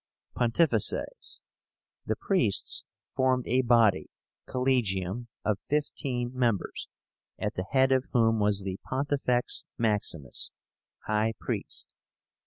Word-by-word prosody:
PONTIFICES. 120 Hz, -, 0 dB, 0.6 s
The 110 Hz, -, +1 dB
priests 125 Hz, -, +2 dB, 0.3 s
formed 130 Hz, -1 st, +2 dB
a 125 Hz, +3 st, +3 dB
body 115 Hz, -5 st, +4 dB, 0.4 s
(collegium) 120 Hz, -4 st, 0 dB, 0.2 s
of 105 Hz, -2 st, +1 dB
fifteen 130 Hz, -4 st, -1 dB
members, 120 Hz, -6 st, -1 dB, 0.5 s
at -, -, -2 dB
the 90 Hz, +1 st, -4 dB
head 130 Hz, 0 st, +4 dB
of 130 Hz, 0 st, +2 dB
whom 115 Hz, -2 st, +3 dB
was 105 Hz, -1 st, +2 dB
the 95 Hz, -1 st, -4 dB
Pontifex 130 Hz, -2 st, 0 dB
Maximus 105 Hz, -, 0 dB, 0.6 s
(high 110 Hz, +1 st, +1 dB
priest). -, -, -4 dB
120 Hz, 100 wpm, -28 LUFS, 105-130 Hz, 0.6 s, body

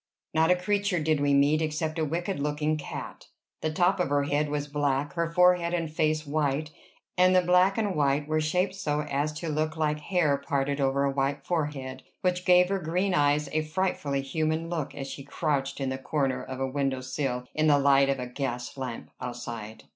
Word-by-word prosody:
Not 160 Hz, +1 st, +3 dB
a 180 Hz, -, +6 dB
creature 200 Hz, 0 st, 0 dB
did 155 Hz, -1 st, +1 dB
we 145 Hz, 0 st, +2 dB
meet, 145 Hz, +3 st, +4 dB
except 155 Hz, +1 st, -2 dB
a 160 Hz, -, +1 dB
wicked 175 Hz, +3 st, -2 dB
looking 150 Hz, +1 st, 0 dB
cat. 150 Hz, -, -7 dB, 0.3 s
The 155 Hz, -, -1 dB
top 180 Hz, +4 st, +2 dB
of 180 Hz, -, +1 dB
her 145 Hz, 0 st, +2 dB
head 145 Hz, +1 st, 0 dB
was 145 Hz, 0 st, -2 dB
black, 145 Hz, -1 st, -1 dB
her 170 Hz, +1 st, -1 dB
forehead 180 Hz, 0 st, +4 dB
and 165 Hz, -3 st, -3 dB
face 155 Hz, 0 st, +1 dB
white; 150 Hz, 0 st, -1 dB, 0.5 s
and 185 Hz, 0 st, +5 dB
the 185 Hz, -, +5 dB
black 180 Hz, +3 st, +4 dB
and 210 Hz, -3 st, 0 dB
white 145 Hz, -1 st, +1 dB
were 155 Hz, 0 st, +1 dB
shaped 180 Hz, +5 st, 0 dB
so 150 Hz, -6 st, -1 dB
as 150 Hz, 0 st, -1 dB
to 160 Hz, +2 st, -5 dB
look 155 Hz, +1 st, -1 dB
like 150 Hz, -1 st, 0 dB
hair 150 Hz, -3 st, +1 dB
parted 140 Hz, 0 st, -1 dB
over 135 Hz, +1 st, +2 dB
a 140 Hz, -, +2 dB
white 140 Hz, +1 st, -1 dB
forehead, 145 Hz, -6 st, -3 dB, 0.2 s
which 180 Hz, 0 st, 0 dB
gave 180 Hz, 0 st, +5 dB
her 195 Hz, 0 st, 0 dB
green 180 Hz, +3 st, 0 dB
eyes 145 Hz, -2 st, +2 dB
a 155 Hz, -, +1 dB
frightfully 155 Hz, -4 st, -1 dB
human 160 Hz, +3 st, -1 dB
look 160 Hz, -5 st, -3 dB
as 135 Hz, -, -5 dB
she 140 Hz, -, -7 dB
crouched 140 Hz, -1 st, -2 dB
in 135 Hz, -1 st, -1 dB
the 130 Hz, 0 st, -3 dB
corner 135 Hz, -1 st, -1 dB
of 130 Hz, 0 st, -7 dB
a 135 Hz, -, 0 dB
window 135 Hz, -1 st, -1 dB
sill 130 Hz, -1 st, -3 dB
in 155 Hz, 0 st, +2 dB
the 145 Hz, -1 st, +6 dB
light 140 Hz, -1 st, +4 dB
of 135 Hz, -, +1 dB
a 125 Hz, -, -4 dB
gas 125 Hz, -1 st, -4 dB
lamp 125 Hz, -3 st, -6 dB
outside. 120 Hz, -3 st, -6 dB
150 Hz, 205 wpm, -27 LUFS, 140-165 Hz, 0.5 s, a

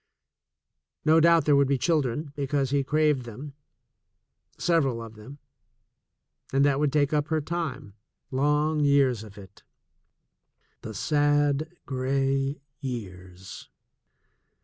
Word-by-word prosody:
No 160 Hz, +1 st, +5 dB
doubt 170 Hz, 0 st, +4 dB
there 145 Hz, -, +4 dB
would 140 Hz, -1 st, +4 dB
be 140 Hz, 0 st, +1 dB
children, 145 Hz, -1 st, -1 dB
because 140 Hz, -1 st, -1 dB
he 140 Hz, -1 st, +1 dB
craved 150 Hz, -1 st, +1 dB
them 130 Hz, +5 st, -9 dB, 0.5 s
— -, -, -44 dB
several 140 Hz, -9 st, +2 dB
of 115 Hz, -1 st, -9 dB
them 110 Hz, +6 st, -12 dB, 0.6 s
— -, -, -36 dB
and 135 Hz, +1 st, +3 dB
that 140 Hz, -1 st, +2 dB
would 150 Hz, -2 st, +1 dB
take 145 Hz, 0 st, +1 dB
up 150 Hz, 0 st, +1 dB
her 160 Hz, -2 st, 0 dB
time, 145 Hz, -, -4 dB, 0.4 s
long 150 Hz, +3 st, +1 dB
years 140 Hz, -6 st, +3 dB
of 105 Hz, -1 st, -13 dB
it 95 Hz, -1 st, -14 dB, 0.6 s
— -, -, -47 dB
the 110 Hz, -, -8 dB
sad, 145 Hz, -, +1 dB
gray 135 Hz, +1 st, -1 dB, 0.2 s
years 95 Hz, -8 st, -8 dB
140 Hz, 125 wpm, -26 LUFS, 130-150 Hz, 0.6 s, No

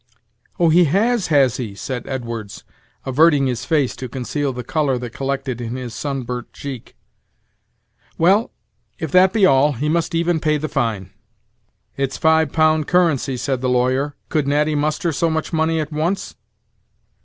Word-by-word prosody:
"Oh! 170 Hz, -2 st, +4 dB
he 175 Hz, +2 st, +5 dB
has, 205 Hz, -, +1 dB
has 140 Hz, -6 st, +3 dB
he?" 110 Hz, -6 st, -5 dB
said 125 Hz, +3 st, -5 dB
Edwards, 115 Hz, -5 st, -6 dB, 0.4 s
averting 145 Hz, +1 st, +4 dB
his 125 Hz, -1 st, -2 dB
face 150 Hz, -6 st, +1 dB
to 130 Hz, -1 st, -6 dB
conceal 135 Hz, +3 st, -2 dB
the 125 Hz, -1 st, -6 dB
color 140 Hz, 0 st, 0 dB
that 120 Hz, -1 st, -7 dB
collected 135 Hz, -2 st, -3 dB
in 120 Hz, +1 st, -4 dB
his 125 Hz, -3 st, -6 dB
sunburnt 125 Hz, -4 st, -4 dB
cheek. 135 Hz, -5 st, -8 dB, 1.2 s
"Well, 195 Hz, +7 st, +3 dB, 0.5 s
if 160 Hz, -4 st, -5 dB
that 185 Hz, +2 st, +5 dB
be 210 Hz, -2 st, +3 dB
all, 145 Hz, -2 st, +4 dB
he 145 Hz, +5 st, -2 dB
must 170 Hz, +1 st, 0 dB
even 170 Hz, 0 st, +1 dB
pay 155 Hz, -1 st, +1 dB
the 155 Hz, +1 st, -3 dB
fine." 110 Hz, -10 st, -2 dB, 0.9 s
"It's 135 Hz, -1 st, -2 dB
five 160 Hz, -2 st, +3 dB
pound 155 Hz, -1 st, +2 dB
currency," 160 Hz, -7 st, +1 dB
said 130 Hz, +1 st, -2 dB
the 130 Hz, -, 0 dB
lawyer; 130 Hz, +3 st, +1 dB
"could 150 Hz, -3 st, 0 dB
Natty 150 Hz, +2 st, +1 dB
muster 155 Hz, +3 st, 0 dB
so 165 Hz, +2 st, 0 dB
much 160 Hz, +1 st, -3 dB
money 160 Hz, 0 st, +1 dB
at 155 Hz, 0 st, -4 dB
once?" 170 Hz, +6 st, -2 dB
145 Hz, 160 wpm, -20 LUFS, 130-160 Hz, 1.2 s, he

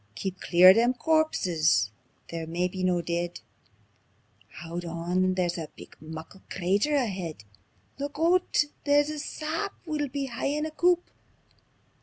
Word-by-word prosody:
"Keep 185 Hz, +9 st, -4 dB
clear 180 Hz, +1 st, +7 dB
o' -, -, +10 dB
them 240 Hz, +4 st, +3 dB
corpses 180 Hz, -, +2 dB, 0.4 s
they're 165 Hz, -1 st, -4 dB
maybe 180 Hz, +3 st, -2 dB
no 180 Hz, -2 st, +1 dB
deid! 170 Hz, +1 st, -3 dB, 1.1 s
Haud 170 Hz, +1 st, -6 dB
on! 175 Hz, +2 st, 0 dB
There's 175 Hz, -2 st, 0 dB
a 160 Hz, -, -6 dB
big -, -, -13 dB
muckle 160 Hz, +5 st, -9 dB
crater 200 Hz, +11 st, +1 dB
aheid. 185 Hz, -, -2 dB, 0.6 s
Look 285 Hz, +1 st, -4 dB
oot! 335 Hz, -2 st, +3 dB, 0.2 s
There's 290 Hz, +1 st, +3 dB
a 305 Hz, -, -5 dB
sap; 320 Hz, +7 st, -3 dB
we'll 300 Hz, -3 st, -1 dB
be 275 Hz, +1 st, -3 dB
haein' 275 Hz, +4 st, -2 dB
a 315 Hz, -, -4 dB
coup. 350 Hz, +2 st, +3 dB
190 Hz, 135 wpm, -27 LUFS, -, 1.1 s, o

